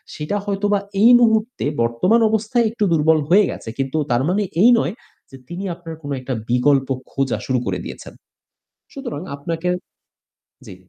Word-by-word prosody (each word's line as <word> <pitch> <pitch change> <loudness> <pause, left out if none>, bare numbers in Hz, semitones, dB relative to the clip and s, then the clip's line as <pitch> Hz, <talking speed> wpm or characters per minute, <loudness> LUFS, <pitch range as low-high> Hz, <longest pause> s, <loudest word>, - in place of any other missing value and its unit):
সেটা 155 +7 -3
হয়তোবা 205 0 0 0.2
এই 235 - +7
মুহূর্তে 220 - +1 0.2
বর্তমান 150 - +2
অবস্থায় 220 +2 +1
একটু 225 - -2
দুর্বল 160 0 +3
হয়ে 200 +3 +6
গেছে। - - -8
কিন্তু 135 +3 -1
তার 120 +1 +2
মানে 205 +3 +1 0.2
এই 230 - +7
নয় - - -1 0.4
যে 135 - -11
তিনি 175 +5 -6
আপনার 165 -2 -9
কোনো 145 0 -4
একটা 130 +1 -4 0.2
বিকল্প 130 +2 +2 0.2
খোঁজা 135 -2 -1
শুরু 130 -2 0
করে - - -2
দিয়েছেন। - - -9 0.8
সুতরাং 245 - -6 0.2
আপনাকে 165 +4 -4 1.0
জি। - - -9
170 Hz, 155 wpm, -20 LUFS, 135-210 Hz, 1.0 s, এই